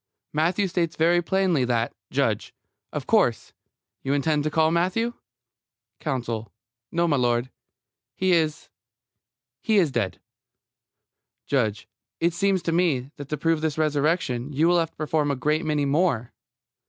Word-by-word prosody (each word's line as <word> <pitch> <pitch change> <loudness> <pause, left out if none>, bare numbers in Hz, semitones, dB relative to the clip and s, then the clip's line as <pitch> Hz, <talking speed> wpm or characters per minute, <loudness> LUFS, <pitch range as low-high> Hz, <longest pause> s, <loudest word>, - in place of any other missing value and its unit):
Matthew 175 +6 +1
states 170 -2 -1
very 170 +2 +3
plainly 180 -5 +1
that 120 -2 0 0.2
JUDGE: - - -1 0.4
Of - - -4
course, - - +2 0.5
you 135 - -1
intend 150 +1 +1
to 155 - 0
call 160 +1 +2
Matthew? 185 +8 +1 0.9
COUNSEL: 115 -7 -3 0.4
No, 170 +1 +1
m'lud. 125 -4 +1 0.6
He 185 0 +1
is 160 -3 +1 0.9
he 220 -1 +2
is 170 -7 +3
dead. 105 -8 -2 1.3
JUDGE: 110 -7 0 0.3
It 170 0 +2
seems 195 0 +1
to 165 - 0
me, 155 -7 +1
that 145 -1 -8
to 150 - -2
prove 165 0 +1
this 155 -2 -1
resurrection 150 -3 0
you 150 +4 +2
will 175 0 +4
have 165 -1 0
to - - -41
perform 155 -1 0
a 140 - +1
great 150 +5 0
many 150 -2 +1
more. 140 -5 +1
155 Hz, 140 wpm, -25 LUFS, 135-170 Hz, 1.3 s, will